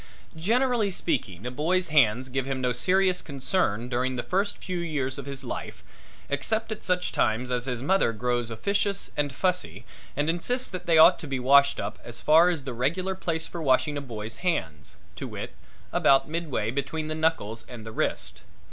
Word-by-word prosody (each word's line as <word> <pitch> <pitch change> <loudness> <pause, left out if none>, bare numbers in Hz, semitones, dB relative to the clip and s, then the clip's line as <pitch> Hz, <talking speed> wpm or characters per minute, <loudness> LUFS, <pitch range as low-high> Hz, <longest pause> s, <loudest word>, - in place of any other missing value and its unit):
Generally 230 +5 +1
speaking 95 - -2
a 125 - -3
boy's 170 +7 0
hands 130 -4 +3
give 135 0 -2
him 135 -1 -2
no 125 -1 +1
serious 185 +8 +2
concern 135 - -1
during 125 +1 -1
the 120 - -3
first 200 +2 -1
few 180 -1 -4
years 145 -5 -2
of 140 - -8
his 140 -1 -5
life 120 - -6 0.4
except 220 +11 -1
at 215 - -4
such 180 -1 0
times 120 +3 0
as 125 -1 0
his 125 -2 -3
mother 190 -5 +3
grows 120 +1 -1
officious 200 - -1
and 145 -1 0
fussy 135 - -1 0.3
and 145 +1 +1
insists 245 +10 +1
that 180 -1 -7
they 165 -2 +5
ought 165 +3 +8
to 160 - -7
be 135 -2 -2
washed 140 +2 +5
up 100 +1 -4
as 120 -1 -7
far 160 +3 +6
as 165 -6 -2
the 130 -2 -5
regular 170 +11 0
place 165 -3 -2
for 170 - -7
washing 145 +1 +2
a 145 - -3
boy's 110 -4 -6
hands, 80 - -2 0.2
to - - -5
wit, - - -6 0.4
about 135 -1 +4
midway 150 -9 -2
between 145 +4 -3
the 155 - -2
knuckles 155 -9 -1
and 120 -3 -9
the 110 - -7
wrist. - - -2
140 Hz, 190 wpm, -26 LUFS, 125-175 Hz, 0.4 s, ought